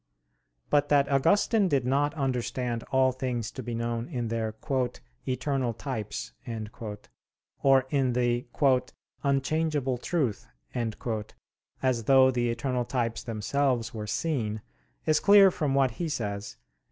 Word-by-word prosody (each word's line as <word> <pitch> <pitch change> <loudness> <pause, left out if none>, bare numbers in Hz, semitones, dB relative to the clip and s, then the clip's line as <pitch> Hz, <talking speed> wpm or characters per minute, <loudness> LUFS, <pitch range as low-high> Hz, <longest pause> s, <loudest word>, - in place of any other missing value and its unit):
But 145 0 +3
that 140 -1 +3
Augustine 200 - +3
did 140 -7 +1
not 145 +4 +1
understand 125 -3 -2
all 130 -1 +4
things 125 -3 -3
to 130 - -7
be 120 -1 -4
known 115 +1 -2
in 120 -3 -3
their 110 -1 -2 0.7
"eternal 130 -2 -1
types" 115 -6 -5 1.3
or 135 -1 +5
in 135 -4 +2
the 120 0 0 0.7
"unchangeable 140 -1 0
truth," 135 -8 -1 1.4
as 125 -3 +1
though 130 0 +6
the 120 -1 0
eternal 125 +1 -1
types 115 -2 -1
themselves 115 +1 -1
were 105 -2 -5
seen, 110 -5 -2 0.4
is 155 -1 +3
clear 200 -2 +7
from 145 -5 -1
what 135 -2 +3
he 165 +8 -3
says 105 -7 -4
(QQ. - - -44
130 Hz, 125 wpm, -28 LUFS, 115-140 Hz, 1.4 s, clear